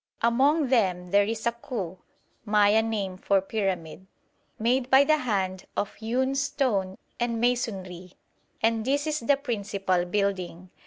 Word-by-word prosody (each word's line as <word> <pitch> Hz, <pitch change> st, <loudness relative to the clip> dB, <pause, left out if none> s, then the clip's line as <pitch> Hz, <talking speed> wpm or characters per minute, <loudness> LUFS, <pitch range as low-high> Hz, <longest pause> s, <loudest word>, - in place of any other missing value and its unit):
Among 270 Hz, +5 st, +3 dB
them 185 Hz, -8 st, +1 dB
there 200 Hz, 0 st, +5 dB
is 220 Hz, +1 st, -4 dB
a 235 Hz, -, +3 dB
Cu 215 Hz, -7 st, -6 dB, 0.4 s
(Maya 210 Hz, 0 st, +4 dB
name 205 Hz, -5 st, -3 dB
for 195 Hz, 0 st, +2 dB
pyramid) 190 Hz, -3 st, -3 dB, 0.5 s
made 245 Hz, +3 st, +1 dB
by 265 Hz, +1 st, +7 dB
the 310 Hz, +2 st, +3 dB
hand 195 Hz, -8 st, -2 dB
of 205 Hz, -, -1 dB
hewn 250 Hz, +4 st, -1 dB
stone 255 Hz, -9 st, -1 dB, 0.2 s
and 235 Hz, -1 st, -1 dB
masonry, 190 Hz, -7 st, -2 dB, 0.5 s
and 225 Hz, 0 st, +2 dB
this 285 Hz, +4 st, 0 dB
is 305 Hz, -1 st, -1 dB
the 275 Hz, +4 st, +2 dB
principal 200 Hz, -8 st, -1 dB
building. 185 Hz, -2 st, -2 dB
220 Hz, 140 wpm, -26 LUFS, 190-250 Hz, 0.5 s, by